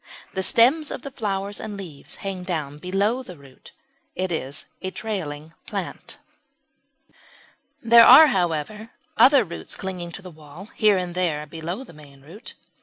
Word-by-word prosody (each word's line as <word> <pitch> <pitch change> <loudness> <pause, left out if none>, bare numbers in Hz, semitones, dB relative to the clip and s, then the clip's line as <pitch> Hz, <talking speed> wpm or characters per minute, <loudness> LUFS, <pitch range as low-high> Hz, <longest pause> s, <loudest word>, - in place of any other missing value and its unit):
The 190 - -2
stems 255 - +3
with - - -7
the 275 - -7
flowers 200 -4 -3
and 210 -2 -6
leaves 170 -8 -10
hang 195 -2 -4
down 150 -5 -4
below 200 +8 0
the 180 -9 -11
root; 135 -2 -17 0.4
it 185 0 -2
is 140 -3 -4 0.2
a 185 - -3
trailing 165 -8 -5
plant. - - -6 1.7
There 235 0 +8
are, 275 +6 +10
however, 190 - -1 0.3
other 270 -1 +6
roots 170 -4 -5
clinging 180 -3 -6
to 195 - -7
the 185 - -10
wall 155 +6 -13
here 210 -3 +3
and 180 -1 -3
there 165 -5 -1
below 165 - -6
the 215 - -15
main 140 -3 -16
root. 165 +10 -12
185 Hz, 155 wpm, -23 LUFS, 160-215 Hz, 1.7 s, are